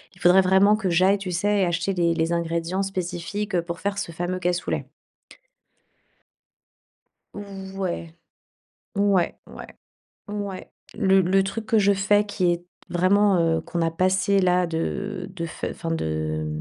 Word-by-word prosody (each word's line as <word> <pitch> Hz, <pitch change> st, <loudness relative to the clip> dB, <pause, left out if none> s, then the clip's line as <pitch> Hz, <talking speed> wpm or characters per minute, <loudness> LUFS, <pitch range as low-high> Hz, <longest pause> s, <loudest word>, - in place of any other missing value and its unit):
il -, -, -20 dB
faudrait 180 Hz, +2 st, +6 dB
vraiment 190 Hz, +3 st, +5 dB
que 215 Hz, -3 st, -2 dB
j'aille, 185 Hz, +4 st, +3 dB
tu 190 Hz, -2 st, -5 dB
sais, 200 Hz, +3 st, +1 dB
acheter 175 Hz, +3 st, -1 dB
les 170 Hz, -2 st, +1 dB
les 165 Hz, 0 st, 0 dB
ingrédients 170 Hz, +2 st, -1 dB
spécifiques, 190 Hz, +1 st, -3 dB
pour 170 Hz, 0 st, -6 dB
faire 200 Hz, 0 st, -2 dB
ce -, -, -4 dB
fameux 175 Hz, +2 st, -3 dB
cassoulet. 180 Hz, 0 st, -1 dB, 2.5 s
Ouais. 195 Hz, -4 st, -5 dB, 0.8 s
Ouais, 200 Hz, -3 st, +2 dB
ouais, -, -, -11 dB, 0.5 s
ouais. 205 Hz, -2 st, -5 dB, 0.2 s
Le 190 Hz, 0 st, +4 dB
le 190 Hz, +2 st, +3 dB
truc 215 Hz, +3 st, -4 dB
que 225 Hz, -2 st, +3 dB
je 200 Hz, -1 st, +4 dB
fais, 200 Hz, +1 st, +3 dB
qui 195 Hz, -3 st, 0 dB
est 175 Hz, 0 st, -4 dB, 0.2 s
vraiment, 190 Hz, +2 st, +3 dB
heu, 165 Hz, -1 st, +2 dB
qu'on 170 Hz, +1 st, -3 dB
a 165 Hz, -, +1 dB
passé, 185 Hz, +4 st, +2 dB
là 180 Hz, -1 st, +3 dB
de 185 Hz, +4 st, -3 dB
de 170 Hz, -, -3 dB, 0.3 s
enfin, 165 Hz, -, -5 dB
de 80 Hz, -, -2 dB
185 Hz, 140 wpm, -24 LUFS, 170-200 Hz, 2.5 s, faudrait